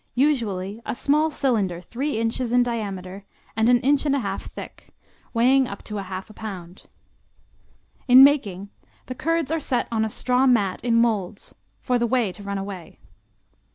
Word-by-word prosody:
Usually 225 -7 0
a - - -4
small 300 +5 +2
cylinder 215 - 0
three 245 - -3
inches 230 +1 -1
in 245 0 +4
diameter 200 -5 -5 0.3
and 220 +2 +2
an 245 -1 +5
inch 280 +2 +2
and 285 -2 +1
a - - +1
half 195 -5 -3
thick, - - -10 0.4
weighing 255 +3 +3
up 200 - -8
to 210 -1 -5
a 195 -2 -7
half 190 +3 -7
pound. 185 -5 -9 1.2
In 255 +1 +9
making, 205 -9 +2 0.3
the 255 - -5
curds 330 +2 -1
are 325 - 0
set 255 -4 -1
on 220 -1 +1
a 220 - -1
straw 250 +4 +1
mat 205 -7 +1
in 235 -1 +1
molds, 215 -4 0 0.3
for 250 -2 0
the 235 - +1
whey 235 -5 +1
to 205 - -13
run 200 0 -4
away. 195 -3 -7
230 Hz, 170 wpm, -23 LUFS, 200-255 Hz, 1.2 s, In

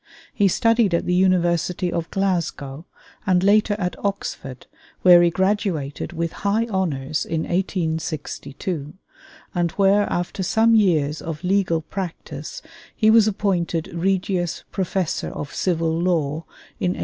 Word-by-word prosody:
He 200 - +3
studied 230 -1 +3
at - - -1
the 180 - 0
University 180 -1 +2
of 165 -1 -2
Glasgow 170 -6 -2 0.4
and 180 -1 +3
later 205 +1 +4
at 180 -3 -2
Oxford, 165 -10 -4 0.4
where 175 -1 +8
he 175 - +5
graduated 185 -6 -1
with 170 -1 -2
high 205 +3 +1
honors 155 -6 -1
in 160 -1 -2
1862, 160 -3 -3 0.6
and 175 -2 0
where 200 +1 +3
after 175 +2 -2
some 220 +5 +3
years 160 -9 +2
of 160 -2 -6
legal 180 -3 +1
practice 190 - -6 0.3
he 220 -1 +4
was 220 -1 +6
appointed 180 -5 -1
Regius 180 -1 -1
Professor 190 -2 -1
of 145 - -7
Civil 165 -3 0
Law 165 -3 0 0.3
in 180 0 +1
1870. - - -8
180 Hz, 130 wpm, -22 LUFS, 165-195 Hz, 0.6 s, where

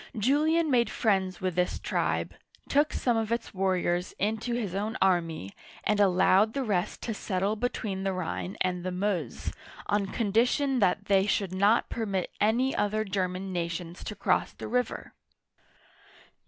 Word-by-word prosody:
Julian 300 +7 +2
made 235 -3 +3
friends 190 -6 0
with 185 -1 -1
this 180 +1 0
tribe, - - -1 0.3
took 295 +2 +3
some 240 -2 +1
of 225 0 -1
its 235 -1 -2
warriors 185 -2 0
into 220 +4 -1
his 215 -7 -2
own 210 +3 -2
army, 165 - +1 0.3
and 210 -1 +1
allowed 195 +2 +4
the 275 - 0
rest 200 -4 -1
to 225 - -2
settle 200 0 -1
between 215 -4 -2
the 195 0 0
Rhine 185 +1 -4
and 180 -1 0
the 185 - -2
Meuse, 180 - -2 0.3
on 205 -1 0
condition 245 +6 +1
that 200 0 +2
they 195 -1 +3
should 195 -2 0
not 205 +5 +3
permit 200 -5 -2
any 235 +6 +2
other 215 +1 +1
German 190 -1 -2
nations 170 0 -4
to 210 - -5
cross - - +1
the - - -7
river. 250 +3 -2
200 Hz, 155 wpm, -28 LUFS, 185-225 Hz, 0.3 s, allowed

